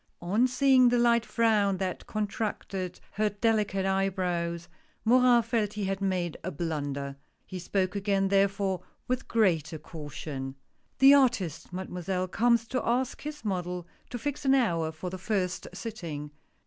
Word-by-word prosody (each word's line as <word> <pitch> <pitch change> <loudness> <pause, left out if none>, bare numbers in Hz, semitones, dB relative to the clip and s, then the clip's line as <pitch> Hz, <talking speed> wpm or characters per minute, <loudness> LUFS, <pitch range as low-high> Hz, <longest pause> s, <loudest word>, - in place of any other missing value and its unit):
On 210 +8 +3
seeing 255 -1 +5
the 245 - +2
light 235 -1 +3
frown 210 -4 +2
that 185 -1 -4
contracted 205 -3 -3
her 215 0 +1
deli 215 +1 +2
cate 195 -1 -2
eyebrows, 180 -3 -1 0.4
Morin 245 0 +5
felt 225 -2 0
he 210 - -3
had 195 0 -2
made 180 -4 -1
a - - -2
blunder. 145 -3 -3 0.3
He 185 - -6
spoke 185 +2 -1
again 195 -1 +1
therefore 195 -1 +2 0.3
with 255 +1 -2
greater 175 -8 +1
caution. 145 -3 -7 0.4
"The 270 +1 +8
artist. 200 - +2
Mademoiselle, 185 0 -3
comes 235 +2 +2
to 255 -1 0
ask 250 +2 0
his 295 -3 -7
model, 180 -3 -2 0.2
to 245 - -4
fix 290 +4 -4
an 270 -1 +4
hour 170 -11 +1
for 160 +3 -6
the 185 - -6
first 185 -3 -1
sitting. 165 -10 -6
195 Hz, 150 wpm, -28 LUFS, 175-230 Hz, 0.4 s, The